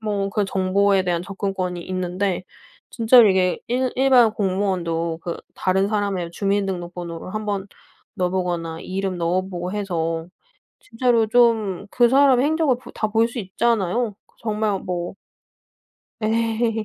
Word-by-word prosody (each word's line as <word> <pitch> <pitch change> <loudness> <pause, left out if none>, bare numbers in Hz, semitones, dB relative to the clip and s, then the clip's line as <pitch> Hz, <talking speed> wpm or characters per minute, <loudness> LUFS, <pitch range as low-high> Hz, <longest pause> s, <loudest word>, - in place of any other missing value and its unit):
뭐 205 -2 -2
그 210 0 0
정보에 195 +1 +2
대한 175 -2 -1
접근권이 190 -2 -3
있는데 185 +1 -2 0.5
진짜로 230 -1 +6
이게 185 -1 +2
일 255 +1 0
일반 255 -4 +5
공무원도 185 -5 -1
그 170 - -4 0.2
다른 190 +1 +1
사람의 200 -5 -1
주민등록번호를 180 -3 -3
한번 205 -2 -2 0.5
넣어 180 -1 0
보거나 175 -3 -2
이름 190 -1 -3
넣어 175 +2 +1
보고 180 -1 -5
해서 165 -5 -2 0.5
진짜로 230 -1 +1
좀 220 -5 +2
그 240 -1 +4
사람의 265 -1 +5
행적을 310 -4 +2
보 250 - -14
다 - - -2
볼 225 +2 +3
수 235 - -9
있잖아요. 220 +1 0
그 - - -32
정말 215 -3 -1
뭐 175 -1 -4 1.1
예. 225 0 0
195 Hz, 280 characters per minute, -22 LUFS, 180-225 Hz, 1.1 s, 진짜로